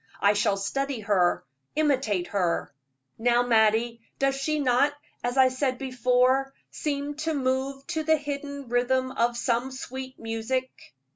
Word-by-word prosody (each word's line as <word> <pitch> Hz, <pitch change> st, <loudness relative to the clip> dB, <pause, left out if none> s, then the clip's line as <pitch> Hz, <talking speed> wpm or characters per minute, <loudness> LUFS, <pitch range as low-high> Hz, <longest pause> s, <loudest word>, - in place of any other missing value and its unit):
I 200 Hz, +1 st, +4 dB
shall 205 Hz, -1 st, +1 dB
study 270 Hz, +5 st, -2 dB
her, 195 Hz, -4 st, +2 dB, 0.3 s
imitate 265 Hz, -, +1 dB
her. 180 Hz, -7 st, -1 dB, 0.5 s
Now, 240 Hz, +1 st, +3 dB
Mattie, 230 Hz, 0 st, +2 dB, 0.2 s
does 275 Hz, 0 st, +2 dB
she 275 Hz, +3 st, -1 dB
not, 275 Hz, +1 st, +3 dB, 0.3 s
as 245 Hz, +2 st, -1 dB
I 260 Hz, -1 st, +6 dB
said 255 Hz, 0 st, -1 dB
before, 255 Hz, +1 st, +2 dB, 0.2 s
seem 290 Hz, -1 st, -3 dB
to 315 Hz, 0 st, -1 dB
move 270 Hz, 0 st, -1 dB
to 330 Hz, -2 st, -2 dB
the 315 Hz, 0 st, +3 dB
hidden 285 Hz, -1 st, -5 dB
rhythm 255 Hz, +2 st, +1 dB
of 235 Hz, -1 st, 0 dB
some 240 Hz, +1 st, 0 dB
sweet 260 Hz, 0 st, -7 dB
music?" 225 Hz, -, -4 dB
260 Hz, 140 wpm, -26 LUFS, 235-275 Hz, 0.5 s, I